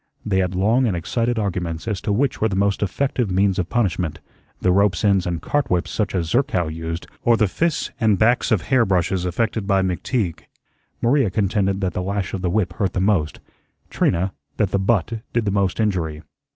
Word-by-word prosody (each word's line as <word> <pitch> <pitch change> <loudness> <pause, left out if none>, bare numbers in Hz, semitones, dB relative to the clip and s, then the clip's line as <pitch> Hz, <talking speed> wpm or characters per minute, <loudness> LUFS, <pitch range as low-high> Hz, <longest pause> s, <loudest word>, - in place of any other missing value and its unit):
They 95 -3 +1
had 90 0 -1
long 115 +7 +3
and 95 -5 0
excited 115 +7 -1
arguments 90 -4 -2
as 100 -4 -2
to - - -2
which 125 +6 0
were 110 - +3
the 95 - -2
most 100 0 +1
effective 120 +3 0
means 95 +1 +2
of 90 - -2
punishment, 90 -8 -1 0.4
the 90 - +2
rope's 100 0 +2
ends 100 -3 +3
and 85 -2 -3
cart 145 -4 0
whips 90 -5 0
such 105 -3 -1
as 85 -2 0
Zerkow 95 - +1
used, 80 +1 -5 0.2
or 120 -1 +3
the 110 - +3
fists 165 - -1
and 110 -4 +3
backs 120 +4 +3
of 105 -5 +2
hair 130 -3 +3
brushes 90 -2 0
affected 110 +3 -1
by 95 -1 +3
McTeague. 90 - -1 0.6
Maria 130 -1 +3
contended 100 0 0
that 95 -2 -1
the 90 - -2
lash 100 +1 -2
of 95 - -3
the 90 - 0
whip 90 -2 0
hurt 95 +2 -1
the - - -1
most; 95 -6 +1 0.5
Trina, 95 +3 +1 0.2
that 100 -2 +1
the 100 - +1
butt 110 +2 0
did 120 -2 +1
the 100 - +1
most 100 -1 0
injury. 85 -7 -1
100 Hz, 205 wpm, -21 LUFS, 90-110 Hz, 0.6 s, long